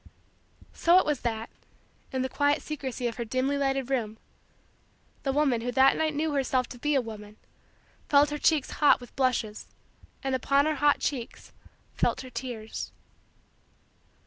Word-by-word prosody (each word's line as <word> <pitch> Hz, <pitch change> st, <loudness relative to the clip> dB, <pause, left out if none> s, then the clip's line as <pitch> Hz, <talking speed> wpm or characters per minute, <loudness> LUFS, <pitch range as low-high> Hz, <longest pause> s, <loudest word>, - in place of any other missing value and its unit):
So 340 Hz, +2 st, +4 dB
it 375 Hz, -, +4 dB
was 295 Hz, -3 st, 0 dB
that, 225 Hz, -2 st, -3 dB, 0.6 s
in 260 Hz, -1 st, -1 dB
the -, -, 0 dB
quiet 290 Hz, +3 st, +1 dB
secrecy 265 Hz, -4 st, -4 dB
of 235 Hz, -1 st, -2 dB
her 240 Hz, -, -2 dB
dimly 255 Hz, +4 st, 0 dB
lighted 270 Hz, -2 st, -1 dB
room, 220 Hz, -5 st, -1 dB, 1.0 s
the 270 Hz, -, -1 dB
woman 270 Hz, -4 st, +2 dB
who 245 Hz, +1 st, -2 dB
that 265 Hz, +1 st, +5 dB
night 315 Hz, -1 st, 0 dB
knew 310 Hz, +1 st, 0 dB
herself 260 Hz, -2 st, +1 dB
to 245 Hz, -, -10 dB
be 295 Hz, +3 st, +1 dB
a 270 Hz, -, +4 dB
woman, 215 Hz, -2 st, -9 dB, 0.7 s
felt 290 Hz, 0 st, +5 dB
her 295 Hz, -, -3 dB
cheeks 305 Hz, -3 st, +2 dB
hot 295 Hz, -, +4 dB
with 245 Hz, -2 st, -13 dB
blushes 250 Hz, -5 st, -1 dB, 0.6 s
and 270 Hz, -1 st, -1 dB
upon 275 Hz, +2 st, +2 dB
her 310 Hz, -1 st, 0 dB
hot 290 Hz, +1 st, +3 dB
cheeks 250 Hz, -5 st, -4 dB, 0.4 s
felt -, -, 0 dB
her 255 Hz, -1 st, -10 dB
tears. 230 Hz, -3 st, -6 dB
265 Hz, 160 wpm, -28 LUFS, 240-290 Hz, 1.0 s, that